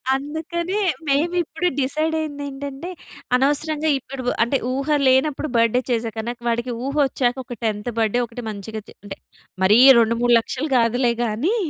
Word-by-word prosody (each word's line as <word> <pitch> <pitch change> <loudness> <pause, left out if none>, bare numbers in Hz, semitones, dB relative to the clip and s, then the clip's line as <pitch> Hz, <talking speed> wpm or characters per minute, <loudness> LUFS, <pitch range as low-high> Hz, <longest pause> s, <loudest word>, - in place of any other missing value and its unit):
అందుకనే 330 +7 -3 0.3
మేము 295 +5 +1
ఇప్పుడు 325 +3 -2
డిసైడయ్యిందేంటంటే. 285 0 -3 0.5
అనవసరంగా 295 +3 +1
ఇప్పుడు 265 0 -8 0.2
అంటే, 265 +3 +1 0.2
ఊహ 275 +2 -3 0.2
లేనప్పుడు 275 +3 +2
బర్డే 230 +2 +3
చేసేకన్నా 225 0 -2 0.2
వాడికి 235 +2 -1
ఊహ 280 +2 -3
ఒచ్చాక 245 -1 -1
ఒక 245 - -7
టెంత్ 215 +1 -2
బర్డ్ 220 -1 +1
డే - - +3
ఒకటి 235 +1 -8
మంచిగా 215 +1 -6
చె - - -13
అంటే 195 -1 -8 0.5
మరీ 210 +4 +6 0.2
రెండు 230 0 +2
మూడు 245 0 +3
లక్షలు 270 +6 -4
కాదులే 240 +1 +2
గాని 240 - 0
265 Hz, 145 wpm, -21 LUFS, 230-300 Hz, 0.5 s, మరీ